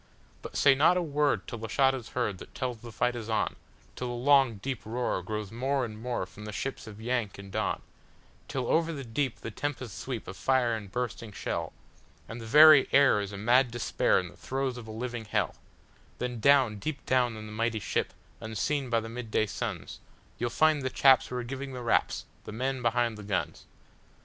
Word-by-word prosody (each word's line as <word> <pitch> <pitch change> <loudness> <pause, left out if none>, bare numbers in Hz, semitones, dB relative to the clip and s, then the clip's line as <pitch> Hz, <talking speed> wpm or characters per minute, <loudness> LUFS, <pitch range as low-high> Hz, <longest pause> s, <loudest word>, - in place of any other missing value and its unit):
But - - -7
say 140 - +6
not 155 +6 +4
a - - +2
word 150 -2 +1
till 120 - -6
the 110 - -5
shot 135 +2 +3
is 125 -3 -6
heard 105 -7 0
that - - -12
tells 125 -3 -3
the 120 +1 -10
fight 125 +2 0
is 115 -2 -6
on, 110 - 0 0.4
Till 125 - -4
the 120 - -3
long, 135 -1 +4
deep 130 +5 -5
roar 120 -3 -2
grows 105 +1 -4
more 130 +3 0
and 110 -2 -7
more 120 -5 -2
from 95 +3 -12
the 105 - -5
ships 110 +5 -4
of 105 -1 -10
"Yank" 120 -3 -2
and 100 0 -10
"Don,"Till 125 +6 -5
over 165 0 +2
the 140 -4 -5
deep 125 +2 -2
the 115 - -5
tempests 130 -3 -4
sweep 125 -5 -5
of 95 - -7
fire 125 +3 +2
and 105 -4 -5
bursting 115 -2 -4
shell, 100 - -3 0.6
And 115 +1 -7
the 115 - -8
very 150 +2 +8
air 135 -7 +5
is 100 0 -5
a 100 - -6
mad 120 +5 +4
Despair 120 -1 +1
in 90 -1 -5
the 85 - -16
throes 130 -1 -2
of 120 -2 -9
a - - -7
living 120 0 -5
hell; 105 - 0 0.6
Then 125 -1 -3
down, 130 -5 +4
deep 140 +4 -4
down, 125 -3 +2
in 110 - -8
the 105 - -9
mighty 115 +1 -1
ship, 105 - -1 0.3
unseen 125 +5 -2
by 115 -1 +2
the 110 - -7
midday 115 -2 -1
suns, 100 - -5 0.4
You 120 - 0
'll - - -2
find 155 +4 +3
the 130 - -1
chaps 135 0 +5
who 125 - -6
are 125 - -2
giving 135 +2 -6
the 125 -1 -6
raps—the 115 - -1
men 130 +4 -2
behind 120 -2 +1
the - - -8
guns! 100 -3 -3
120 Hz, 210 wpm, -29 LUFS, 110-135 Hz, 0.6 s, very